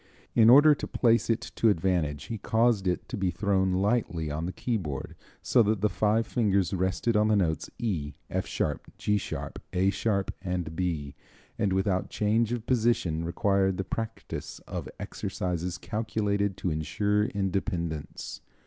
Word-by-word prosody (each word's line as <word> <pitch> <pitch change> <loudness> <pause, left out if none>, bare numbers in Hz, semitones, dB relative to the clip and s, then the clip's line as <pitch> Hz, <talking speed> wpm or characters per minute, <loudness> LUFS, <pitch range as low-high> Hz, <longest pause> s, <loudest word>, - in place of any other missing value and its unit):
In 115 -1 +6
order 145 +4 +9
to - - -5
place 115 -1 +2
it 115 - +2 0.2
to 115 - +4
advantage 80 -6 0
he 115 - -5
caused 110 -2 +2
it 90 - -1
to 125 - -4
be 95 -4 0
thrown 95 +1 +1
lightly 95 -6 0
on 80 +3 -2
the - - -2
keyboard 90 - -3 0.3
so 120 - +4
that 105 -2 +1
the 105 - +3
five 110 +4 +2
fingers 100 -7 +1
rested 95 +5 0
on 105 0 +4
the 110 - +3
notes 85 -6 0
E, 90 -12 -2
F - - -2
sharp, - - -2
G 105 0 +1
sharp, - - -6
A 95 +2 +3
sharp 100 -2 0
and 90 -4 -3
B, 80 -6 -2 0.5
and 100 - +1
without 95 0 +1
change 110 +2 +1
of 120 -2 -3
position 110 -10 +1
required 95 +2 +1
the 95 - -1
practice 115 +3 -5
of - - -5
exercises 90 -1 -3
calculated 100 -1 -1
to 90 - -1
insure 100 +7 +1
independence. 90 -6 -3
100 Hz, 160 wpm, -28 LUFS, 90-110 Hz, 0.5 s, order